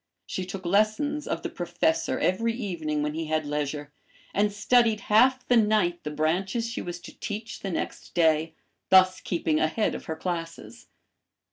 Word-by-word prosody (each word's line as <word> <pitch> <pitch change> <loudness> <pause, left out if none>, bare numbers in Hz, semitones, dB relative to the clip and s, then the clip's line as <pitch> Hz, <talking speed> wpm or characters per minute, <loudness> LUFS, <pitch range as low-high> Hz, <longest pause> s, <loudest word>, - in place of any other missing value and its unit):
She 185 -1 -4
took 185 0 -7
lessons 215 +11 +1
of - - -3
the - - -2
Professor 175 -2 0
every 230 +6 +1
evening 160 -10 -2
when 150 0 -2
he 160 +1 -3
had 155 0 -1
leisure, 145 0 -3 0.4
and 205 +1 +2
studied 220 +1 +3
half 255 +4 +5
the 245 - +5
night 210 -6 +2
the 150 - -3
branches 180 +9 0
she 230 - -4
was 175 0 -6
to - - -12
teach 220 +1 -5
the 195 - -4
next 170 - -5
day, 160 -1 +2 0.3
thus 185 -1 +6
keeping 160 -3 0
ahead 170 +8 +1
of - - -7
her 160 - -4
classes. 175 +7 -6
180 Hz, 165 wpm, -26 LUFS, 160-215 Hz, 0.4 s, thus